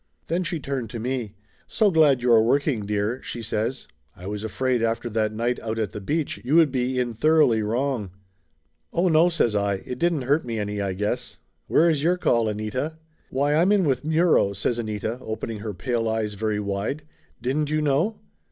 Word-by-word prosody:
Then 170 +3 -1
she 170 -2 -2
turned 135 -4 -4
to 115 - -6
me. 120 -3 -3 0.3
"So 210 -3 +2
glad 145 -7 +4
you 125 - +3
are 115 -1 +7
working, 125 -2 +1
dear," 105 +4 -1
she 120 - -6
says. 110 +4 -2 0.3
"I 90 - -12
was 105 +1 -4
afraid 125 +2 0
after 115 +1 -1
that 110 -1 0
night 120 +3 -1
out 110 0 -4
at 110 -4 -1
the 105 - -7
beach 150 +9 -2
you 135 +6 +1
would 165 -4 +6
be 130 0 -1
in 125 -2 0
thoroughly 125 -2 +3
wrong 115 0 -1 0.4
!" 80 0 -47
"Oh, 175 +2 +2
no!" 165 +2 +5
says 120 -10 +1
I. 100 -1 +1
"It 125 0 -6
didn't 170 -5 +1
hurt 145 +5 +2
me 115 -2 -4
any, 105 -1 -2
I 100 -1 -1
guess 105 +3 -3
\ - - -48
Where 165 - +4
is 155 -4 +2
your 175 +4 +2
call, 115 -10 +2
Anita?" 110 +9 -3 0.3
"Why, 140 +2 +1
I'm 170 +5 +4
with 135 -5 0
Muro!" 160 - +3
says 115 +4 -1
Anita, 110 +1 -3
opening 110 -1 -5
her 105 -2 -5
pale 115 +3 -1
eyes 110 -1 -1
very 105 0 -1
wide. 100 +9 -3 0.4
"Didn't 140 +5 -1
you 155 0 +1
know?" 150 +10 +1
120 Hz, 200 wpm, -24 LUFS, 110-150 Hz, 0.4 s, are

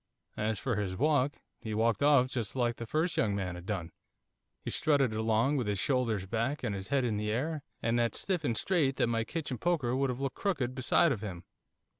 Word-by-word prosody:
As 110 0 0
for 120 +2 -1
his 95 -3 -2
walk, 145 0 +2 0.2
he 110 -1 -4
walked 115 -1 +2
off 140 -3 +5
just 120 -5 -3
like 120 -2 0
the 115 - -6
first 160 +7 0
young 105 -3 +2
man 95 -3 -2
had 90 +1 -9
done, 90 -6 -3 0.7
he - - -5
strutted 140 -6 +2
along 110 +6 +2
with 120 -5 -1
his 100 -1 0
shoulders 115 -4 0
back, 115 +8 -2
and 115 -4 -1
his 95 -1 -5
head 135 -2 +1
in 110 -3 0
the 105 0 -1
air, 150 +7 -1 0.2
and 115 +1 +2
that 115 -1 +1
stiff 180 -5 0
and 115 -5 0
straight 155 -8 +2
that - - +2
my 115 -1 0
kitchen 140 -2 -4
poker 150 -8 +1
would 135 0 +1
have 125 0 -3
looked 135 -2 -3
crooked 140 -11 -1
beside 130 +5 +3
of 110 -7 -2
him. 95 -5 -6
120 Hz, 220 wpm, -31 LUFS, 110-140 Hz, 0.7 s, off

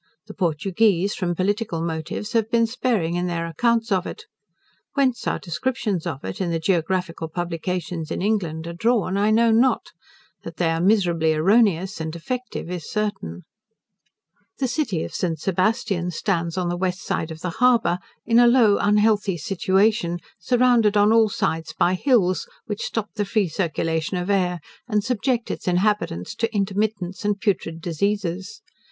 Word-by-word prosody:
The - - -10
Portugueze, 185 +3 +1
from 175 -2 -2
political 200 -1 -1
motives, 165 +4 -4
have 225 -2 +1
been 230 0 +3
sparing 225 -7 0
in 175 +1 -1
their 170 -1 -2
accounts 230 +7 0
of 185 -2 +1
it. 445 - -7 0.7
Whence 265 -4 +1
our - - +1
descriptions 190 0 -2
of 145 -5 -5
it, 200 - -5
in 180 - 0
the 165 - 0
geographical 165 -1 -1
publications 175 0 -3
in - - -3
England, 180 -6 -1
are 170 - -5
drawn, 205 0 +1
I 205 +2 +2
know 225 +1 +4
not: 245 +4 +2 0.5
that - - -9
they 165 -2 +1
are 165 0 -1
miserably 175 -5 +3
erroneous 190 0 +2
and 160 0 -3
defective, 240 +7 -5
is 175 -4 -5
certain. 205 - -3 1.1
The 265 - 0
city 245 - -1
of - - -7
St. 170 -3 -1
Sebastian 190 -1 0
stands 170 -1 -1
on 180 -1 0
the 175 - -1
west 185 0 -2
side 160 - -2
of 160 0 -8
the 180 - -3
harbour, 235 -8 +4 0.3
in 230 +1 +4
a 240 - +7
low 235 -4 +5
unhealthy 210 -2 +2
situation, 190 +2 +1 0.2
surrounded 235 0 +3
on 205 +2 +5
all 225 -1 +5
sides 160 -4 -2
by 180 - +3
hills, 185 -4 +2 0.2
which 210 -1 -4
stop 220 -2 -3
the 210 - -1
free 205 -1 +1
circulation 165 0 -1
of 180 +3 -1
air, 180 -3 +1 0.3
and 210 -3 +1
subject 245 0 -1
its - - -6
inhabitants 180 - 0
to 230 - 0
intermittents 200 -2 -2
and 205 -1 0
putrid 185 -6 -1
diseases. 190 +3 -2
190 Hz, 160 wpm, -23 LUFS, 170-220 Hz, 1.1 s, a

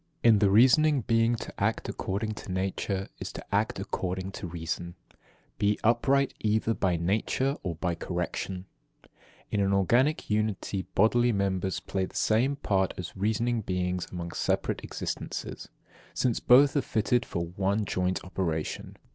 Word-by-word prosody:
11. 115 - +7
In 105 - +3
the 100 -1 +4
reasoning 130 +7 +5
being 115 +1 +2
to - - -7
act - - 0
according 105 +3 -2
to 105 - -8
nature 95 +1 -2
is - - -5
to - - -8
act - - +1
according 95 +1 -3
to 95 - -6
reason. 85 +1 -4 0.2
12. - - -30 0.4
Be 105 0 +2
upright 135 +4 +3
either 110 +1 +1
by 90 -5 +1
nature 110 - 0
or 90 -3 -3
by 90 +2 -1
correction. 90 +2 -4 0.4
13. - - -26 0.4
In 105 - +1
an 100 0 +2
organic 120 - +2
unity 105 -3 -1
bodily 120 +4 +4
members 95 -2 0
play 95 -1 -2
the - - -14
same 120 +6 +2
part 95 -9 0
as 90 -2 -6
reasoning 110 +4 0
beings 90 -2 -2
among 85 -1 -5
separate - - -1
existences, - - -5 0.5
since 120 -3 +1
both 135 +4 +6
are 140 - +3
fitted 120 +1 +1
for 85 -6 -3
one 100 +4 0
joint 90 0 -1
operation. 85 -4 -3
100 Hz, 155 wpm, -28 LUFS, 90-115 Hz, 0.5 s, 11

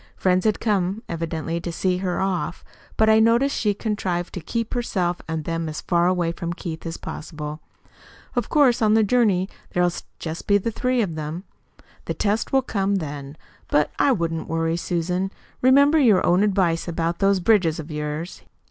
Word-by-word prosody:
Friends 185 +1 +1
had 215 -1 +2
come 200 0 0
evidently 165 0 -3
to 170 - -4
see 180 +2 0
her 180 -1 -2
off, 190 -2 -2 0.3
but 220 - +4
I 220 0 +6
noticed 235 +5 +3
she 210 -2 +1
contrived 185 -5 -2
to - - -4
keep 230 +7 -3
herself 185 -8 -1
and 160 -1 -3
them 165 -1 -2
as 155 - -5
far 175 0 +2
away 180 -2 +1
from 170 0 -4
Keith 165 -2 -6
as 165 - -5
possible. 150 -1 -6 0.8
Of - - -1
course, 275 -7 +4
on 215 -1 +4
the 220 - +5
journey 205 -5 +2 0.3
there'll 180 0 +2
be - - -8 0.2
just 160 0 -6
the 205 +2 +2
three 250 +1 +1
of 175 -5 -3
them. 155 +3 -5 0.6
The - - -3
test 210 +1 0
will 265 -1 +3
come 200 -4 0
then. 145 -4 -5 0.3
But 150 0 +2
I 280 - +4
wouldn't 165 -7 -1
worry, 165 0 0
Susan. 180 +2 -1 0.3
Remember 280 +4 +5
your 220 -9 +4
own 180 +2 +4
advice 185 -5 +1
about 170 0 -2
those 195 -1 +3
bridges 180 -5 +3
of 160 0 -7
yours. 150 +3 -4
180 Hz, 180 wpm, -23 LUFS, 165-215 Hz, 0.8 s, I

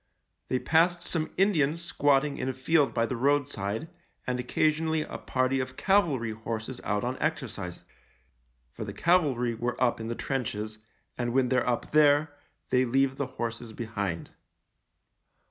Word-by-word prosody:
They 130 - +1
passed 170 +5 +2
some 160 -3 -1
Indians 170 -6 +3
squatting 145 -4 +1
in 130 - -1
a - - -1
field 140 +3 +2
by 115 - +1
the 125 - -3
roadside, 135 -2 0 0.4
and 125 0 -1
occasionally 155 +5 +1
a - - -7
party 130 +1 0
of 130 0 -4
cavalry 155 - +2
horses 110 +2 -5
out 105 0 -1
on 125 +2 -2
exercise 110 - -3 0.4
— - - -42
for - - -6
the - - -6
cavalry 140 -9 +2
were 120 +2 -3
up 120 -2 +2
in 110 - -4
the 115 - -3
trenches, 110 -5 -3 0.4
and 120 -1 -1
when 130 -1 +3
they're 125 -1 +2
up 120 - -2
there 145 0 +4 0.4
they 125 0 +4
leave 135 +2 +1
the 140 - -1
horses 115 -1 -4
behind. 100 -7 -4
130 Hz, 155 wpm, -28 LUFS, 115-145 Hz, 0.4 s, there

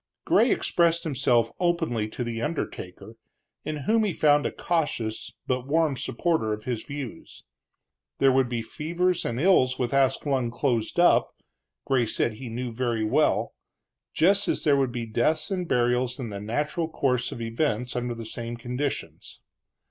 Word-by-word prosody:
Gray - - +4
expressed 170 -1 +2
himself 125 - +2
openly 165 -11 0
to 115 +3 -5
the 115 -1 -4
undertaker, 115 - -5 0.5
in 155 - -3
whom 225 0 +3
he 205 -4 0
found 145 -2 +3
a - - -4
cautious, 145 -10 -2
but 130 0 -2
warm 155 -1 +2
supporter 135 -2 0
of 105 0 -6
his 120 -2 -3
views. 140 -5 -8 0.7
There 135 -1 +4
would 130 -1 +2
be 120 -2 -2
fevers 175 +7 -1
and 120 +1 -2
ills 130 -7 +4
with 125 0 -2
Ascalon 135 -2 +1
closed 120 +2 -1
up, 175 - +4 0.5
Gray 125 -4 +2
said 110 - 0
he 120 +3 -8
knew 120 +1 -4
very 120 -2 -1
well, 110 - +2 0.6
just 195 +4 +3
as - - 0
there 145 -2 +4
would 135 -3 +1
be 120 -1 -4
deaths 120 - +1
and 180 -2 -2
burials 125 0 +1
in 120 -5 -5
the 100 -1 -6
natural 150 +9 -2
course 125 -5 0
of - - -7
events 115 +1 -1
under 125 -1 -2
the 115 -1 -7
same 115 +1 -6
conditions. 125 +4 -4
130 Hz, 160 wpm, -26 LUFS, 115-155 Hz, 0.7 s, Gray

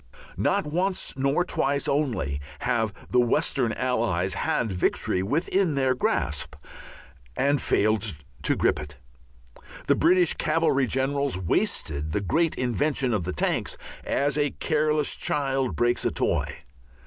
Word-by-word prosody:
Not - - +1
once 180 +5 -1
nor 140 +5 +1
twice 140 -5 0
only 120 - -1 0.2
have 115 -3 0 0.2
the 125 - +3
Western 120 0 +1
Allies 110 -8 0
had 110 +2 -1
victory 90 0 0
within 160 - +1
their 130 -2 +2
grasp 75 - -1 0.8
and 140 +1 +2
failed 110 -3 +1 0.3
to - - +1
grip - - +1
it. 75 -1 -8 0.9
The - - +4
British 175 +1 +4
cavalry 140 -5 +1
generals 135 -1 0
wasted 75 -4 -1
the - - +1
great 165 - +1
invention 130 +1 0
of 95 -6 -1
the 90 - -3
tanks 75 - -1 0.3
as 145 +1 0
a 145 0 +2
careless 150 0 0
child 135 -3 -1
breaks 120 0 +1
a - - +2
toy. - - -1
130 Hz, 130 wpm, -26 LUFS, 105-145 Hz, 0.9 s, The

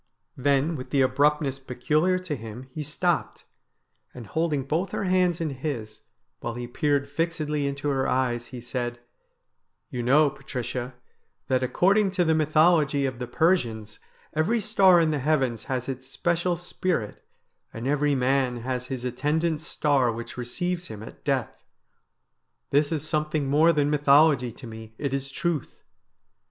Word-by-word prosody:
Then 140 +4 +1
with 130 -3 -7
the 140 -2 +3
abrupt 145 +4 +3
ness 135 -1 -3
peculiar 150 +8 +1
to 180 -5 -4
him 115 0 -8
he 155 - -5
stopped, 165 +4 -1 0.7
and 120 -2 -8
holding 160 0 -1
both 165 +8 -2
her - - -1
hands 185 -2 +2
in 160 -3 -1
his, 130 -6 -5 0.4
while 120 0 -4
he 120 0 -4
peered 140 +2 0
fixedly 150 -1 -1
into 140 +1 -3
her 135 -1 0
eyes, 120 -2 0
he 125 - -8
said: 120 -1 -4 0.5
' - - -52
You 125 - -3
know, 140 +4 +4
Patricia, 125 -2 -5 0.5
that 130 -1 +2
according 195 - +3
to 175 - +3
the 160 - +3
mythology 155 -2 +3
of 130 -2 -3
the 125 - -4
Persians 115 - 0 0.3
every 175 +10 +1
star 195 -4 +5
in 160 -2 +3
the 150 - -1
heavens 130 -5 0
has 130 -2 -3
its 130 -1 -5
special 170 +4 0
spirit, 175 - -3 0.5
and 115 +2 -7
every 145 0 +2
man 130 -2 +1
has 125 +1 -3
his 125 -2 -4
attendant 150 +5 0
star 140 -5 +1
which 115 +1 -7
receives 175 +9 -3
him 110 -1 -8
at - - -12
death. - - -2 1.1
This 145 +2 +3
is 155 -1 -2
something 155 -2 0
more 155 +5 +5
than 145 -2 +1
mythology 145 -3 +4
to 120 - -12
me, 110 -1 -10
it 140 -2 -2
is 135 0 -2
truth. 160 0 -3
140 Hz, 160 wpm, -26 LUFS, 125-160 Hz, 1.1 s, star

